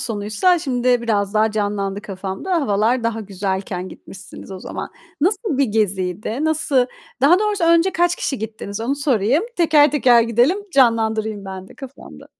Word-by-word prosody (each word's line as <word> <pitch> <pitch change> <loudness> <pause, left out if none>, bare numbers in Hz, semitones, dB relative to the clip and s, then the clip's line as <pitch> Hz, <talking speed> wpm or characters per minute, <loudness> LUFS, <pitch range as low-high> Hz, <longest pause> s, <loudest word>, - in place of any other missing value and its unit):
sonuysa 220 - +1
şimdi 250 -4 0
biraz 205 -3 -1
daha 220 +1 +3
canlandı 205 -1 -2
kafamda, 195 - -4
havalar 230 +1 +1
daha 225 -1 -1
güzelken 190 -2 -4
gitmişsiniz 195 +1 -12
o 190 - -7
zaman. - - -6 0.3
Nasıl 365 - 0
bir 280 - +4
geziydi? 210 - -1
Nası 285 -5 +1 0.3
Daha 325 +7 +5
doğrusu 415 -4 0
önce 335 +3 +4
kaç 350 +1 +1
kişi 270 - -3
gittiniz 220 -1 -6
onu 250 +5 -1
sorayım? 270 - +1
Teker 310 -4 +4
teker 250 -5 +4
gidelim, 240 - +2
canlandırayım 220 -4 +1
ben 190 0 -8
de - - -15
kafamda. 270 -1 -12
230 Hz, 150 wpm, -20 LUFS, 205-285 Hz, 0.3 s, Daha